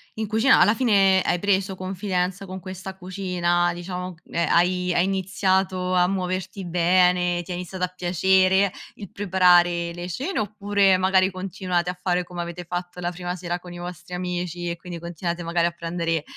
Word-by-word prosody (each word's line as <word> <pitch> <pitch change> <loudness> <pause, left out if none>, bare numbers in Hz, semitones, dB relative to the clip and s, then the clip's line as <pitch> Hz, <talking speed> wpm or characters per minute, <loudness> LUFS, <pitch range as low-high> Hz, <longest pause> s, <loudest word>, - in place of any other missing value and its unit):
in 220 0 -3
cucina 220 +5 +4
alla 195 +5 +6
fine 195 -6 +4
hai 175 - +1
preso 195 0 +1
confidenza 185 0 -2
con 190 0 -7
questa 190 0 -8
cucina, 175 -2 0
diciamo, 180 0 -6
ehm, 170 - -1
hai 180 +1 +2
hai 175 - +3
iniziato 190 -1 0
a 180 0 +4
muoverti 185 0 -3
bene, 180 0 +3
ti 180 - -9
è - - -2
iniziata 180 +1 -3
a 180 - -11
piacere 190 +2 +3 0.2
il 200 -4 -9
preparare 175 -3 +3
le 175 +1 -6
cene? 300 - -3
Oppure 205 -2 +2
magari 185 0 +3
continuate 185 -1 -2
a 180 - -4
fare 180 -1 +1
come 175 0 -6
avete 170 +1 -6
fatto 175 +1 -5
la 175 0 -2
prima 175 0 -4
sera 175 0 -3
con 180 0 -11
i 175 - -8
vostri 175 0 -8
amici 180 -1 -3
e 170 - -2
quindi 175 -1 -8
continuate 170 +1 -4
magari 170 0 +1
a - - -2
prendere 165 -2 -2
180 Hz, 175 wpm, -24 LUFS, 175-190 Hz, 0.2 s, alla